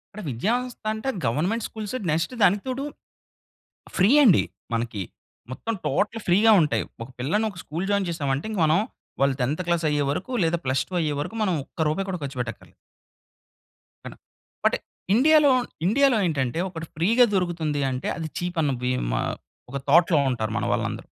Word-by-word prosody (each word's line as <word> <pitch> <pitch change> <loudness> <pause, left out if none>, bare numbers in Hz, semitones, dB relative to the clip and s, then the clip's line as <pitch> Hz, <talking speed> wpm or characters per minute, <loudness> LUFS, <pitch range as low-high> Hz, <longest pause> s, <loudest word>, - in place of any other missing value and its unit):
అంటే, 215 - -7
విద్యా 160 - 0
వ్యవస్థ 250 -1 -8
అంటే, 220 +5 -3 0.2
గవర్నమెంట్ 180 - 0
స్కూల్స్ 215 +1 -6 0.2
నెక్స్ట్ 165 +9 0
దానికి 200 +1 +4
తోడు, 260 +2 -2 1.1
ఫ్రీ 190 +3 +5
అండి 200 -9 +6 0.3
మనకి. 115 -3 -2 0.5
మొత్తం 225 +12 -3
టోటల్ 225 +2 0
ఫ్రీ 175 +2 +5 0.2
ఉంటాయి. 150 - +1 0.2
ఒక 115 - -8
పిల్లని 165 - 0
ఒక 190 - -13
స్కూల్ 170 +6 -4
జాయిన్ 200 -2 +1
చేసామంటే, 140 -2 -2
ఇంక 210 -4 -2
మనం 160 +5 +3 0.4
వాళ్ళు 140 -1 +3
10థ్ 150 +8 -1
క్లాస్ 170 -2 +1
అయ్యేవరకు, 145 - -1
లేదా 165 +1 +1
ప్లస్ 130 0 +1
టు - - -6
అయ్యేవరకు 150 +7 -2
మనం 185 -4 +1
ఒక్క 160 +2 -3
రూపాయి 195 +5 -2
కూడా 180 -3 -4
ఖర్చు 135 -1 -6
పెట్టక్కర్లేదు. 120 -2 -6 1.3
అన - - -8 0.5
అంటే - - +1 0.4
ఇండియాలో, 300 +3 +6 0.4
ఇండియాలో 265 +2 +4
ఏంటంటే 135 -3 -1
ఒకటి 165 -2 -7
ఫ్రీ‌గా 225 +10 +4
దొరుకుతుంది 165 -5 -1
అంటే 130 +1 -3
అది 165 -1 -4
చీప్ 175 0 -4
అన్న 145 - +1
భీమా 125 - 0 0.5
ఒక 140 - -3
థాట్‌లో 165 +1 +5
ఉంటారు 110 -3 -2
మనవాళ్ళందరూ. - - -2
170 Hz, 155 wpm, -25 LUFS, 140-210 Hz, 1.3 s, అండి